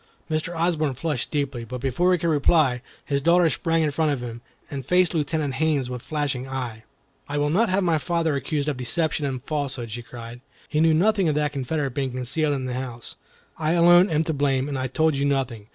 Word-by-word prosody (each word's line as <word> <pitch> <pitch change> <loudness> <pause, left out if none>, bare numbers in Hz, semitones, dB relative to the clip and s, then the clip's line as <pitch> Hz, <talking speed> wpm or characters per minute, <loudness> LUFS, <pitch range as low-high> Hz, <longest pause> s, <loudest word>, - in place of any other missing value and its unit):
Mr. 155 +2 -2
Osborne 160 -4 0
flushed 145 -2 -2
deeply, 140 -5 -2
but 125 +2 -6
before 135 +8 +1
he 180 - +4
could 170 - -2
reply, 145 -4 +3 0.2
his 140 -1 0
daughter 170 +3 +4
sprang 165 +1 +1
in 150 - +1
front 155 +1 +1
of 140 - -1
him, 120 -1 -7 0.3
and 140 -2 -4
faced 180 +1 +3
Lieutenant 150 -2 -1
Haines 140 -3 0
with 125 -1 -5
flashing 140 -4 -2
eye. 120 -4 -5 0.4
"I 145 - -2
will 145 0 +1
not 215 +7 +3
have 190 +1 +2
my 165 -3 +2
father 165 0 0
accused 140 +2 -2
of 145 -4 -1
deception 150 +4 -1
and 130 -2 -4
falsehood," 135 -6 -3
she 120 +3 -5
cried. 120 0 -10 0.3
"He 150 - -1
knew 160 -1 +5
nothing 195 0 +3
of 150 - 0
that 150 -1 0
Confederate 140 +1 -2
being 135 0 -2
concealed 140 +4 0
in 130 -2 -3
the 125 - -3
house. 125 -2 -6 0.4
I 155 +1 +1
alone 175 +2 +6
am 155 -1 +2
to 160 - -2
blame, 135 -2 +1
and 140 -2 -3
I 130 - -1
told 155 +4 +1
you 140 - -1
nothing. 130 -7 -1
145 Hz, 215 wpm, -24 LUFS, 130-160 Hz, 0.4 s, alone